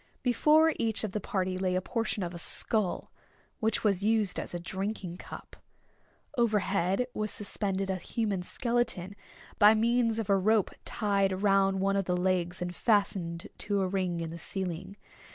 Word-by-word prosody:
Before 305 Hz, +6 st, +4 dB
each 225 Hz, -1 st, +1 dB
of 215 Hz, -, -2 dB
the 210 Hz, -, -2 dB
party 185 Hz, -3 st, -2 dB
lay 185 Hz, -1 st, 0 dB
a -, -, +3 dB
portion 220 Hz, 0 st, -2 dB
of 175 Hz, 0 st, -4 dB
a 170 Hz, -, -6 dB
skull, 210 Hz, +2 st, 0 dB, 0.5 s
which 220 Hz, -1 st, 0 dB
was 200 Hz, -3 st, +2 dB
used 215 Hz, -2 st, +1 dB
as -, -, -5 dB
a -, -, -2 dB
drinking 190 Hz, 0 st, -4 dB
cup. -, -, -10 dB, 0.8 s
Overhead 200 Hz, -2 st, +1 dB
was 215 Hz, 0 st, -2 dB
suspended 195 Hz, -4 st, -2 dB
a 190 Hz, -, -1 dB
human 200 Hz, +1 st, -2 dB
skeleton, 225 Hz, -3 st, -1 dB, 0.4 s
by 210 Hz, +1 st, +8 dB
means 230 Hz, 0 st, +2 dB
of 225 Hz, -3 st, -2 dB
a 200 Hz, -, +4 dB
rope 215 Hz, +1 st, +2 dB
tied 195 Hz, -2 st, 0 dB
round 195 Hz, -1 st, +3 dB
one 195 Hz, +1 st, +2 dB
of 195 Hz, -1 st, +1 dB
the 180 Hz, 0 st, 0 dB
legs 180 Hz, -1 st, 0 dB
and 175 Hz, 0 st, -5 dB
fastened 190 Hz, -6 st, 0 dB
to 205 Hz, -1 st, 0 dB
a 190 Hz, -, +1 dB
ring 180 Hz, -3 st, -1 dB
in 165 Hz, -1 st, -4 dB
the 170 Hz, -, -7 dB
ceiling. 185 Hz, +2 st, -4 dB
195 Hz, 170 wpm, -30 LUFS, 185-220 Hz, 0.8 s, by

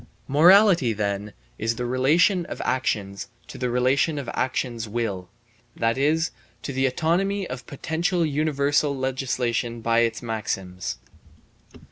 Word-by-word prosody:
Morality, 170 Hz, -, +6 dB
then, 100 Hz, 0 st, -2 dB, 0.3 s
is 115 Hz, +2 st, 0 dB
the 125 Hz, -, -3 dB
relation 150 Hz, +9 st, +3 dB
of -, -, -7 dB
actions 100 Hz, -6 st, -1 dB, 0.2 s
to -, -, -10 dB
the 125 Hz, -1 st, -1 dB
relation 130 Hz, +5 st, +2 dB
of 140 Hz, -4 st, -5 dB
actions 125 Hz, -4 st, -2 dB
will, 100 Hz, -5 st, -3 dB, 0.5 s
that 115 Hz, 0 st, +1 dB
is, 155 Hz, +5 st, +1 dB, 0.3 s
to 140 Hz, -, -4 dB
the 135 Hz, +1 st, +2 dB
autonomy 180 Hz, +8 st, 0 dB
of 125 Hz, -1 st, -7 dB
potential 170 Hz, +4 st, -1 dB
universal 145 Hz, -1 st, +1 dB
legislation 125 Hz, -3 st, -1 dB
by 115 Hz, 0 st, +2 dB
its 115 Hz, 0 st, 0 dB
maxims. 95 Hz, -5 st, -4 dB
130 Hz, 125 wpm, -24 LUFS, 115-150 Hz, 0.5 s, Morality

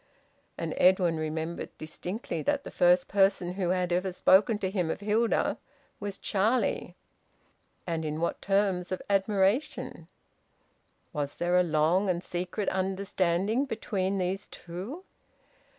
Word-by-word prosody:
And -, -, -3 dB
Edwin 180 Hz, -3 st, +4 dB
remembered 160 Hz, +2 st, -4 dB
distinctly 180 Hz, +7 st, -5 dB
that 285 Hz, -1 st, 0 dB
the -, -, -8 dB
first 180 Hz, 0 st, +4 dB
person 195 Hz, -3 st, +2 dB
who 185 Hz, -2 st, -1 dB
had 180 Hz, -1 st, +1 dB
ever 185 Hz, +2 st, 0 dB
spoken 195 Hz, +4 st, +4 dB
to 190 Hz, -2 st, -2 dB
him 180 Hz, -5 st, 0 dB
of -, -, -3 dB
Hilda 215 Hz, +3 st, +1 dB, 0.4 s
was 200 Hz, -1 st, -5 dB
Charlie! 220 Hz, +5 st, 0 dB, 0.9 s
And 165 Hz, -2 st, -2 dB
in 155 Hz, 0 st, -3 dB
what 170 Hz, -, -1 dB
terms 195 Hz, -3 st, +1 dB
of 185 Hz, -, -3 dB
admiration! 200 Hz, +5 st, +1 dB, 1.1 s
Was 145 Hz, -2 st, -3 dB
there 175 Hz, +1 st, 0 dB
a 180 Hz, -, +6 dB
long 170 Hz, +4 st, +2 dB
and 175 Hz, 0 st, 0 dB
secret 180 Hz, +4 st, -3 dB
understanding 190 Hz, +4 st, 0 dB
between 200 Hz, -6 st, -2 dB
these 185 Hz, +2 st, -2 dB
two? 195 Hz, -, -8 dB
185 Hz, 130 wpm, -29 LUFS, 175-200 Hz, 1.1 s, a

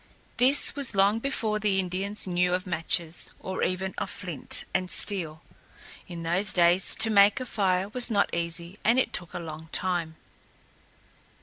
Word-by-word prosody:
This 265 Hz, +6 st, +4 dB
was 275 Hz, -7 st, +2 dB
long 200 Hz, +3 st, +3 dB
before 225 Hz, -5 st, -2 dB
the 205 Hz, -2 st, 0 dB
Indians 190 Hz, +3 st, -3 dB
knew 180 Hz, -1 st, +1 dB
of 185 Hz, +2 st, -5 dB
matches, 170 Hz, -1 st, -1 dB
or 190 Hz, 0 st, -5 dB
even 185 Hz, +1 st, -2 dB
of -, -, -4 dB
flint 180 Hz, -7 st, +3 dB
and 185 Hz, -1 st, -1 dB
steel. 170 Hz, -7 st, -3 dB, 0.6 s
In 170 Hz, -2 st, -8 dB
those 175 Hz, +5 st, 0 dB
days 175 Hz, +1 st, +2 dB
to 220 Hz, 0 st, +2 dB
make 200 Hz, +1 st, +5 dB
a 255 Hz, -, -5 dB
fire 190 Hz, -5 st, 0 dB
was 245 Hz, +3 st, -1 dB
not 200 Hz, -3 st, 0 dB
easy 170 Hz, +3 st, -4 dB
and 230 Hz, +3 st, +3 dB
it 260 Hz, -, 0 dB
took 175 Hz, -, -3 dB
a -, -, -3 dB
long 160 Hz, -1 st, -9 dB
time. 175 Hz, -3 st, 0 dB
185 Hz, 165 wpm, -26 LUFS, 175-210 Hz, 0.6 s, make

